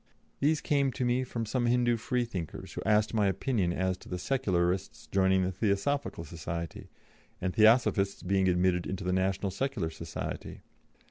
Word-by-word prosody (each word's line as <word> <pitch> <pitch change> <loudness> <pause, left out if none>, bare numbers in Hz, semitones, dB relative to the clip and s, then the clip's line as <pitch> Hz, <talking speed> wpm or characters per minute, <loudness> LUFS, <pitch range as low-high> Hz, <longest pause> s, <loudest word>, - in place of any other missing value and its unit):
These 150 +2 +2
came 140 -2 +2
to 130 - -1
me 125 +1 +2
from 120 -2 -4
some 120 +2 0
Hindû 120 -1 +2
Freethinkers, 115 - -3
who - - -5
asked 105 0 +3
my 105 -3 +3
opinion 95 -1 0
as 95 +1 0
to 90 - -6
Secularists 95 -6 -1
joining 95 -1 +2
the 90 - 0
Theosophical 100 +3 -1
Society, 85 0 -6 0.5
and 90 0 -2
Theosophists 110 -3 +4
being 95 0 +2
admitted 90 +1 +1
to 90 - -7
the 90 0 0
National 95 +1 0
Secular 105 -6 -2
Society. 80 0 -6
100 Hz, 150 wpm, -30 LUFS, 90-120 Hz, 0.5 s, Theosophists